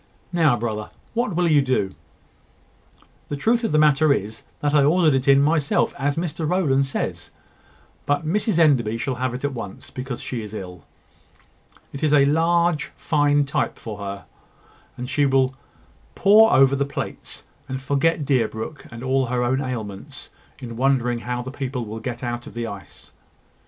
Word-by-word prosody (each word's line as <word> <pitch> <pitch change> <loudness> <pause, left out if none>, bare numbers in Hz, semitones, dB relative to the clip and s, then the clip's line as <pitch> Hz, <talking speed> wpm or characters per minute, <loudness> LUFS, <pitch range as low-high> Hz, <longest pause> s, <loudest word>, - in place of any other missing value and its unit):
Now, 155 -8 +3
brother, 110 -2 -3 0.2
what 230 -5 -1
will 175 0 +2
you 150 -3 +5
do?" 130 -8 0 1.4
"The 145 - -2
truth 230 - +1
of 225 - 0
the 155 - +3
matter 150 0 +4
is, 110 -4 -1 0.2
that 145 0 0
I 145 -2 +5
ordered 160 +1 +4
it 135 0 0
in 140 0 +6
myself, 150 -1 +1
as 140 +1 0
Mr 165 -2 -2
Rowland 140 -7 +2
says. 130 - -4 0.8
But 145 +2 +1
Mrs 200 +3 +1
Enderby 130 -9 +3
shall 130 +3 -2
have 130 -1 -1
it 130 - -7
at 145 - -2
once, 105 -6 -8
because 130 -1 -5
she 120 -3 -4
is 105 0 -8
ill. 90 -6 -8 1.1
It 140 - -7
is 155 -2 +2
a 140 -2 +6
fine 140 - +2
large 170 -1 +1 0.5
type 140 - -1
for 105 -2 -8
her; 100 -1 -6 0.7
and 125 - -5
she 140 +2 +2
will 135 -1 +2 0.6
pore 220 +3 +6
over 135 0 +5
the 140 - +1
plates, 140 - -6 0.3
and 130 0 -3
forget 145 +3 0
Deerbrook 125 +1 -2
and 120 +1 -8
all 130 0 +1
her 125 0 0
own 130 +3 +1
ailments, 110 -7 -6 0.3
in 115 -2 -8
wondering 125 -2 +1
how 125 +1 -4
the 130 - -7
people 130 -3 -4
will 110 +1 -6
get 120 +2 -5
out 120 0 -4
of - - -11
the 120 0 -3
ice." 100 -3 -10
135 Hz, 170 wpm, -22 LUFS, 120-150 Hz, 1.4 s, in